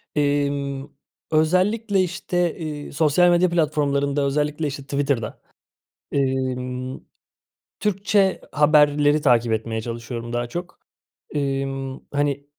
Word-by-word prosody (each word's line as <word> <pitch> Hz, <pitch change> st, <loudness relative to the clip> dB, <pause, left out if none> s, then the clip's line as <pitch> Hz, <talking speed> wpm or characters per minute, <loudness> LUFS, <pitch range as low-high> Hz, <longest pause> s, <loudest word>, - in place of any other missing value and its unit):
Eee, 145 Hz, -1 st, +2 dB
ımm, 140 Hz, 0 st, -4 dB, 0.4 s
özellikle, 190 Hz, +6 st, +2 dB
işte, 175 Hz, -1 st, -1 dB, 0.3 s
ııı, -, -, -10 dB
sosyal 155 Hz, +4 st, +4 dB
medya 175 Hz, +1 st, +4 dB
platformlarında 145 Hz, -3 st, +1 dB
özellikle, 150 Hz, +2 st, 0 dB
işte, 140 Hz, 0 st, -5 dB
Twitter'da, 140 Hz, -4 st, -2 dB, 0.7 s
imm, 130 Hz, -1 st, -1 dB, 0.8 s
Türkçe 200 Hz, -1 st, +1 dB
haberleri 150 Hz, 0 st, +4 dB
takip 120 Hz, -4 st, +3 dB
etmeye 110 Hz, 0 st, -2 dB
çalışıyorum 115 Hz, 0 st, -6 dB
daha 120 Hz, 0 st, -1 dB
çok. 175 Hz, +5 st, -6 dB, 0.6 s
Emm, 135 Hz, -1 st, -2 dB
hani, 140 Hz, -1 st, 0 dB
145 Hz, 100 wpm, -23 LUFS, 135-160 Hz, 0.8 s, sosyal